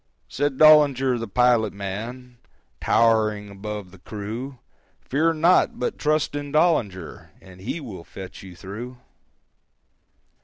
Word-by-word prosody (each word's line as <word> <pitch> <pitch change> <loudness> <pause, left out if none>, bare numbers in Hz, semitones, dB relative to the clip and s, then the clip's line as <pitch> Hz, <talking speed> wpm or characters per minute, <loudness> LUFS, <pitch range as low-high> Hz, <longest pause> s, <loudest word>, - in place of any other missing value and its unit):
Said 145 -1 -2
Dollinger 140 -5 +5
the 115 - -4
pilot 120 0 +2
man, 115 +6 -7 0.4
Tow'ring 110 -2 +2
above 100 -1 -7
the 95 - -16
crew, 110 +8 -6 0.4
"Fear 160 +5 +1
not, 170 +4 +3
but 125 - -3
trust 155 0 +1
in 145 -1 -5
Dollinger, 115 - 0
And 95 -1 -15
he 120 - -4
will 110 - -9
fetch 95 +2 -10
you 95 -2 -11
through." 110 +8 -8
115 Hz, 120 wpm, -23 LUFS, 100-140 Hz, 0.4 s, Dollinger